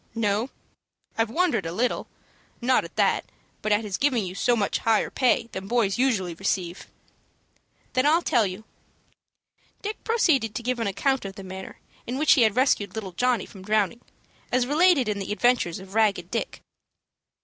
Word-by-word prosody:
"No; 220 +2 0 0.7
I've 225 -1 +1
wondered 245 - +1
a - - -4
little, 235 +8 -1 0.5
not 255 +1 +2
at - - -11
that, - - +2 0.4
but 215 - -1
at 210 +2 +3
his 200 -3 -3
giving 255 -7 +1
you 180 - -5
so 240 +5 +2
much 205 -3 0
higher 225 -1 +1
pay 245 -3 +2
than 190 +1 -6
boys 230 -2 +1
usually 210 -10 +1
receive." 180 0 -3 1.1
"Then 255 +2 +2
I'll 330 +3 +4
tell 230 -4 +2
you." 185 +4 -7 1.2
Dick 420 +1 -5
proceeded 285 - +2
to 235 - -4
give 250 0 -1
an 230 - -1
account 265 +7 0
of 195 -1 -7
the 195 - -9
manner 190 0 -8 0.3
in 250 +2 -3
which 305 +1 +3
he 275 - +3
had 220 -3 +4
rescued 250 -6 +1
little 205 -4 -5
Johnny 245 +3 +1
from 195 - -13
drowning, 215 +3 0 0.5
as 250 0 +2
related 300 -2 +4
in 210 -1 -1
the 195 - -4
adventures 225 -6 +2
of 190 0 -11
"Ragged 220 -2 +1
Dick." - - -3
225 Hz, 175 wpm, -25 LUFS, 195-255 Hz, 1.2 s, I'll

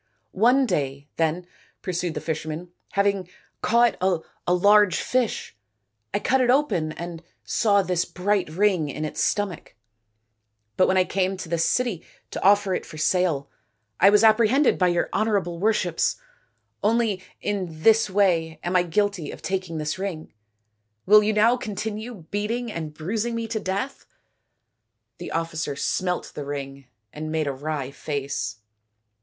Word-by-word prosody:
" - - -48 0.2
One 265 +2 +5
day, 140 - -2
then/' 165 +2 0 0.4
pursued 180 -2 -2
the - - -3
fisherman, 160 +2 -4
" - - -36
hav 200 0 +2
ing 195 -3 0 0.3
caught 235 0 +3
a 180 -1 -2
large 200 +1 +5
fish, 250 - -1 0.6
I - - 0
cut 260 +5 +2
it 250 - +2
open 250 - +2
and 170 -1 -7 0.2
saw 200 -3 +2
this 180 -2 0
bright 195 -1 -1
ring 180 -2 +1
in 155 +3 -4
its 150 - -2
stomach; 200 - -2 1.0
but 185 - +4
when 190 - +2
I 185 - +5
came 190 +1 -1
to 185 -3 -7
this 165 -1 +1
city 240 -9 0 0.3
to - - -5
offer 200 -1 +4
it - - -2
for 155 - -11
sale 155 -4 +1 0.5
I 195 - +7
was 210 +2 +5
apprehended 230 +5 +4
by 180 - +4
your 175 -1 +1
honourable 200 -6 0
worships. 185 -5 +1 0.7
Only 215 -3 +1 0.2
in 180 -6 -4
this 225 -1 +5
way 175 -5 +1
am 175 +1 -2
I 180 - +6
guilty 180 -1 -1
of - - -9
taking 185 -3 -2
this 155 +3 -3
ring. 185 -5 -5 0.7
Will 210 +2 +7
you 210 +1 +1
now 225 +4 +4
continue 215 -3 -5
beating 225 +3 -2
and 160 -5 -5
bruising 215 +10 -3
me 230 0 -3
to 220 -1 -1
death? 200 +8 -4 0.5
" - - -54
The - - -6
officer 160 -3 -2
smelt 180 +5 -1
the 145 - -5
ring 140 -1 -6 0.3
and 155 +1 -5
made 160 -1 0
a 140 - -1
wry 140 -1 -4
face. 140 -5 -4
185 Hz, 160 wpm, -24 LUFS, 160-210 Hz, 1.0 s, I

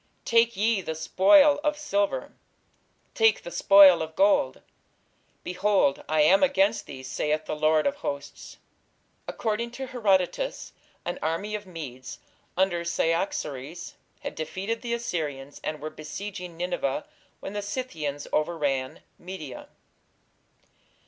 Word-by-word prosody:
Take 230 -2 +3
ye 215 0 +2
the 160 -3 -4
spoil 285 - +5
of 300 -1 +1
silver, 305 +9 -1 0.8
take 225 -1 +3
the 175 - -7
spoil 190 0 +7
of 160 0 -5
gold.... 195 -9 +2 0.8
Behold, 185 -5 +1
I 155 0 +3
am 185 +6 +5
against 280 -1 +2
thee, 130 -2 -9
saith 150 +4 -2
the - - -3
Lord 155 0 +2
of 280 0 0
hosts." 140 - -6 0.7
According 225 +1 -2
to 265 +2 -5
Herodotus, 225 - 0 0.3
an 175 - -3
army 165 +7 -2
of 210 -2 -5
Medes 135 -8 -8 0.4
under 185 -2 +1
Cyaxares 165 -3 -2 0.3
had - - -5
defeated 190 +8 -4
the 235 -1 -2
Assyrians 150 -11 -4
and 155 -1 -3
were 155 +1 -6
besieging 180 +3 -7
Nineveh 170 -5 -2 0.3
when 195 - -7
the 205 - -2
Scythians 170 - -4
overran 145 -5 -1 0.2
Media. 175 -6 -8
180 Hz, 120 wpm, -26 LUFS, 155-220 Hz, 0.8 s, spoil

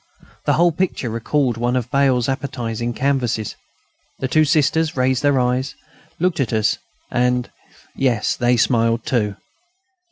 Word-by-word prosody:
The - - +3
whole 175 +1 +4
picture 165 -8 -2
recalled 120 +2 0
one 120 +2 0
of 125 -1 -2
Bail's 130 -3 +2
appetising 120 -4 -3
canvases. 125 -5 -1 0.6
The 130 - -2
two 155 +4 +3
Sisters 155 +1 +1
raised 130 0 +2
their 145 -2 +3
eyes, 125 +2 0 0.4
looked 180 -1 0
at 125 -4 0
us 110 -1 +1 0.3
and 125 0 +1 0.4
yes, 125 -5 +1
they 120 0 +2
smiled 115 -1 +2
too. 105 -5 0
125 Hz, 135 wpm, -20 LUFS, 120-140 Hz, 0.6 s, whole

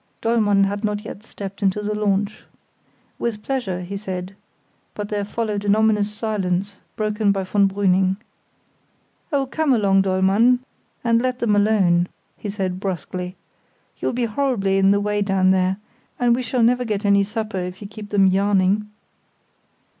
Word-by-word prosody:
Dollmann 215 -4 +3
had 200 +2 -1
not 210 0 -2
yet 210 - -8
stepped 200 -2 -8
into 200 +1 +1
the 210 +1 -1
launch. 205 0 0 0.8
"With 215 -3 -3
pleasure," 210 -10 -2
he 185 +3 -6
said; 190 -1 -5 0.6
but 205 0 -5
there 205 -1 -1
followed 210 -1 -3
an 205 0 +3
ominous 215 -1 +2
silence, 200 -3 -2 0.2
broken 215 -1 +1
by 195 -1 -1
von 200 +1 +2
Brüning. 190 -1 +2 1.1
"Oh, 280 -2 +1
come 290 +1 +1
along, 195 -4 +3
Dollmann, 195 +6 +3 0.5
and 230 -1 +3
let 255 0 -1
them 230 -4 +1
alone," 195 -5 +3 0.3
he 210 - -6
said 190 -3 -3
brusquely. 180 -1 -4 0.6
"You'll - - -1
be 240 0 0
horribly 215 -5 0
in 195 0 +4
the 200 0 +4
way 205 0 -1
down 195 -2 +3
there, 190 0 +2 0.4
and 240 -1 +3
we 255 - -2
shall 250 -1 0
never 250 +2 +3
get 210 -3 -2
any 200 0 +4
supper 215 -1 -3
if 180 +1 -5
you 205 - -7
keep 210 0 -10
them 200 -1 +4
yarning." 195 +1 +2
205 Hz, 160 wpm, -22 LUFS, 195-220 Hz, 1.1 s, in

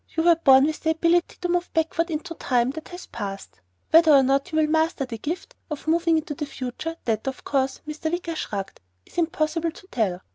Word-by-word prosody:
You 320 - +3
were 340 0 +6
born 270 -4 +6
with 310 0 -2
the 320 - -1
ability 335 +2 +2
to 355 - 0
move 355 0 0
backward 325 +1 +1
into 330 +2 -4
time 250 -5 +1
that 315 +2 -8
has 355 0 -9
passed. 195 -1 -7 0.3
Whether 325 0 +7
or 275 -2 +7
not 275 +5 +1
you - - -4
will 315 - +4
ever 305 - 0
master 320 -3 +1
the 230 -3 -7
gift 340 - -5 0.2
of 300 -2 -6
moving 330 0 +3
into 310 -1 -3
the 295 0 -5
future, 270 +5 -5
that, 225 +2 -1
of 265 - -4
course" 270 -1 -1
Mr. 310 +1 -3
Wicker 345 -1 -2
shrugged 200 -9 -5 0.2
"is - - -6
impossible 330 0 0
to 375 +4 -13
tell. 190 -6 0
315 Hz, 220 wpm, -24 LUFS, 270-335 Hz, 0.3 s, Whether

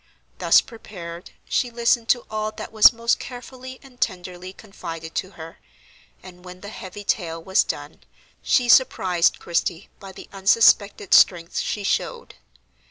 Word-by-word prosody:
Thus - - +5
prepared, 180 -7 -10 0.2
she 245 - 0
listened 235 0 0
to 245 - +2
all 215 0 -3
that - - -8
was 220 -1 +7
most 230 0 0
carefully 255 +1 -10
and 255 -2 -18
tenderly 180 -2 -4
confided 165 -5 -9
to 185 - -3
her, 165 0 -11 0.6
and, 180 -1 -14
when 180 0 -12
the 205 - -8
heavy 205 -1 -9
tale 165 -5 -2
was 190 +3 +2
done, 145 +1 -7 0.4
she 250 -2 +1
surprised 185 -8 +3
Christie 170 +1 -3
by 195 -1 -10
the - - -12
unsuspected 200 0 +3
strength 170 -2 +4
she 205 - -3
showed. 470 - -3
195 Hz, 145 wpm, -22 LUFS, 175-230 Hz, 0.6 s, was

